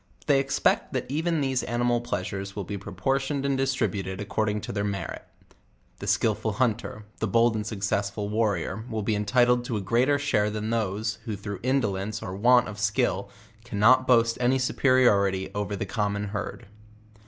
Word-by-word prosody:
But - - -24
they 135 - +5
expect 135 0 +1
tha', - - -1
even 165 +1 0
these 130 -2 0
animal 120 0 0
pleasures 95 -3 -4
will 100 - -3
be 100 - -5
proportioned 135 - -2
and 140 -1 +1
distri 135 0 +1
buted 95 -2 -5
according 105 0 -1
to - - -5
their 100 0 -2
merit; 100 -1 -4 0.8
the - - -6
skillful 110 0 +1
hunter, 105 -2 -1
the 110 - 0
bold 115 +3 +3
and 105 -1 -3
successful 100 0 -2
warrior, 105 -2 0
\v 110 +1 -7
ill 110 - 0
be 110 +1 0
entitled 120 +4 +3
to 120 -4 -2
a - - -3
greater 120 +9 +2
share 125 -8 +1
than 110 +1 -3
those 110 -1 -1
who 110 -3 -3
through 100 -1 -6
indolence 110 -5 -1
or 90 - -5
want 120 +4 +4
of 105 0 -8
skill 100 -1 0 0.3
cannot 120 +3 +4
boast 115 -2 +4
of - - -8
any 125 +2 +3
superiority 100 -8 +2
over 105 0 -2
the 100 - -3
common 100 0 -2
herd. 105 0 -5
110 Hz, 180 wpm, -26 LUFS, 100-125 Hz, 0.8 s, they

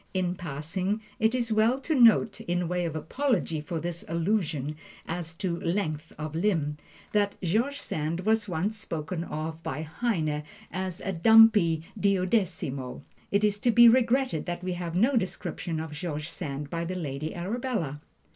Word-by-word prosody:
In 180 -1 +1
passing, 175 +5 -3 0.2
it 220 +2 +3
is 235 -3 0
well 225 +4 +3
to 315 - -1
note, 230 -5 +5
in 175 0 -1
way 180 0 -1
of 160 -2 -3
apology 165 - 0
for 165 +2 -4
this 170 +1 -4
allusion 165 -5 0 0.3
as 165 -1 -4
to 170 -1 -2
"length 165 -4 -2
of 155 0 -5
limb," 160 -5 0 0.3
that 205 -1 +1
George 235 +11 +1
Sand 155 +3 -2
was 215 +1 +1
once 185 +6 -1
spoken 165 -4 -4
of 160 0 -5
by 150 0 -4
Heine 155 -4 -1 0.3
as 185 0 -4
"a 195 - -2
dumpy 205 -4 +6 0.2
duodecimo." 185 - 0 0.3
It 200 +1 +2
is 205 -1 +2
to 240 - +2
be 235 +1 +8
regretted 245 - +3
that 175 0 -3
we 185 0 -1
have 175 -1 -4
no 240 +9 +3
description 180 -5 -2
of 160 -1 -5
George 150 0 -4
Sand 145 -5 -5
by 170 0 -2
the 180 +2 -3
Lady 155 -3 -4
Arabella. 185 - -2
175 Hz, 160 wpm, -28 LUFS, 160-215 Hz, 0.3 s, be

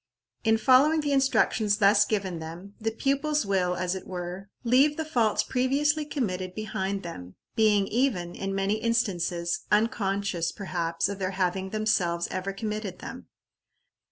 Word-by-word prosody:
In 225 -1 +4
following 275 +7 +5
the 290 -1 -1
instructions 250 -6 +2
thus 205 0 +5
given 195 -5 -2
them, 170 +5 -9
the 225 - 0
pupils 275 +4 0
will, 185 -2 +1
as 180 0 -1
it 190 -1 -7
were, 180 +2 -6
leave 265 +5 +4
the 320 - -2
faults 235 -8 +1
previously 290 +4 +1
committed 185 -11 -3
behind 200 -2 -3
them, 90 - -8 0.2
being 210 -3 +4
even, 210 -8 0
in 195 +1 -4
many 195 +2 0
instances, 180 -7 0
unconscious, 200 -6 +1
perhaps, 170 -4 -2
of 200 0 -5
their 185 0 -3
having 190 0 0
themselves 185 -5 0
ever 185 +1 -3
committed 210 -2 -4
them. - - -9
200 Hz, 145 wpm, -27 LUFS, 185-235 Hz, 0.2 s, following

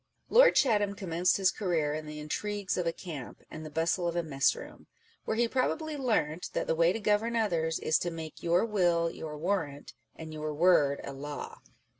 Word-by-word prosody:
Lord - - +7
Chatham 205 -6 +3
commenced 180 -2 +1
his 190 -2 +3
career 165 -7 -1
in 155 0 -5
the 150 0 -7
intrigues 200 +6 -3
of 180 -2 -1
a - - +2
camp 160 -7 -8
and 155 - -7
the 155 - -7
bustle 165 +3 0
of 170 - -2
a 175 - 0
mess 135 -4 +2
room; - - -11 0.4
where 220 - -1
he 235 0 +3
probably 300 +5 -1
learnt 200 - -1
that - - -1
the - - +1
way 165 +1 +3
to 225 - -3
govern 215 +2 +1
others 170 -8 0
is 155 - +1
to 175 - -2
make 160 -2 -8
your 175 +4 +2
will 175 -6 +2
your 150 -1 -7
warrant, 155 -4 -2 0.2
and 160 -1 -8
your 155 -1 -4
word 150 -4 +4
a 140 - -6
law. 145 +2 -7
170 Hz, 200 wpm, -30 LUFS, 155-205 Hz, 0.4 s, Lord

